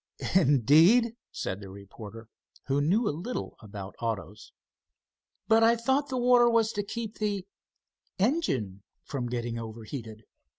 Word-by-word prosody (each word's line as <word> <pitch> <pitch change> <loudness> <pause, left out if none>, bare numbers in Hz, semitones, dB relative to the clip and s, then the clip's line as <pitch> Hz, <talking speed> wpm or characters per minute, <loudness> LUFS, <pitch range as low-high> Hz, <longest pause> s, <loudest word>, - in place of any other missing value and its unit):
"Indeed," 165 - +5 0.2
said 95 +2 -4
the 100 - -9
reporter, 100 +3 -11 0.4
who 140 +1 +1
knew 200 +10 +2
a - - 0
little 215 +11 -5
about 100 -3 -8
autos. 105 -2 -4 1.0
"But 225 0 +5
I 230 +1 +6
thought 265 +5 0
the 260 - -2
water 245 -1 +5
was 225 -1 +3
to 205 -2 -2
keep 225 +1 -6
the 205 -3 -1 0.7
engine 160 - 0 0.2
from 125 -4 -4
getting 120 -1 -3
overheated." 110 0 -8
145 Hz, 130 wpm, -28 LUFS, -, 1.0 s, I